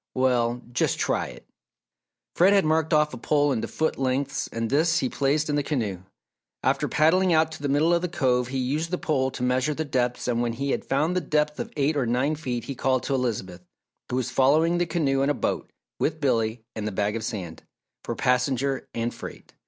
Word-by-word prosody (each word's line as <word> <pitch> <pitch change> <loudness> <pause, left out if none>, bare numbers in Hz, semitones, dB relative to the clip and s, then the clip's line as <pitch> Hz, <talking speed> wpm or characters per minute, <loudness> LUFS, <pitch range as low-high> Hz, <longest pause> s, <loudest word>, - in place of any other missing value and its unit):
"Well, 125 -2 +1
just 120 - +1
try - - 0
it!" - - -12 0.9
Fred 185 +4 +5
had 195 -4 +4
marked 160 0 +1
off 150 -1 +3
a - - -7
pole 145 +3 +2
into 120 -4 -1
foot 160 -3 -1
lengths 135 +1 -1
and 115 0 -2
this 160 +6 +2
he 130 - 0
placed 145 +2 +1
in 150 - 0
the 145 - +2
canoe. 115 - -2 0.6
After - - +1
paddling 180 +4 +3
out 160 0 +3
to 160 - -9
the 145 - -1
middle 150 +5 +3
of 170 - +2
the 180 - -1
Cove 125 -6 +1
he 135 +2 -3
used 145 +6 -1
the 180 - -1
pole 135 -6 0
to 125 - -6
measure 130 +4 +1
the 160 - -2
depths 125 -4 -1
and 120 -1 +1
when 120 -1 0
he 135 +3 -2
had - - -2
found 150 +6 +1
the 180 - +1
depth 150 -1 0
of - - -4
eight 145 +2 +2
or 135 -5 0
nine 130 +6 +1
feet 125 -6 -3
he 140 - -5
called 130 0 0
to 140 - -2
Elizabeth, 105 -9 -2 0.5
who - - -2
was 130 -2 -1
following 160 +6 +3
the 175 - +1
canoe 145 -5 +1
in 140 - +2
a 145 - +1
boat - - -2 0.3
with 155 +1 0
Billy 115 -5 0
and 105 -1 -3
the - - -2
bag 105 +2 -1
of 115 - -3
sand, 90 -7 -5 0.4
for - - -4
passenger 130 +1 0
and 115 +1 -1
freight. - - -10
135 Hz, 220 wpm, -25 LUFS, 125-155 Hz, 0.9 s, Fred